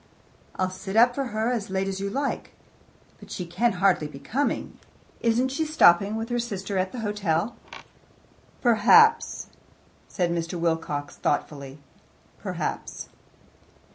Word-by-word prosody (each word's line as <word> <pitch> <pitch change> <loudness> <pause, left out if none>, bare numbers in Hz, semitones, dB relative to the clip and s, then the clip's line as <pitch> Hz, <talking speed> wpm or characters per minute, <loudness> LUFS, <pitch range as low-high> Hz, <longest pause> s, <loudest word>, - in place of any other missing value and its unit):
"I'll 185 0 -1
sit 190 +2 -7
up 240 +2 +6
for 275 +1 -2
her 220 0 -1
as 225 -6 -2
late 190 0 -1
as 195 0 -3
you 200 0 -2
like, 280 +7 -3 0.7
but - - -14
she 180 - -4
can 225 +8 +1
hardly 180 -4 +2
be 150 - -11
coming. 235 - -2 0.4
Isn't 240 +3 +2
she 275 +5 -1
stopping 205 - +4
with 225 +1 -4
her 240 0 0
sister 200 -4 -3
at 185 0 -1
the 245 - -6
hotel?" 205 -1 -1 1.1
"Perhaps," 355 - +5 0.6
said 175 -3 -1
Mr. 170 0 -2
Wilcox 160 -4 -2
thoughtfully 140 -2 -2 0.6
"perhaps." - - -4
200 Hz, 135 wpm, -25 LUFS, 175-240 Hz, 1.1 s, up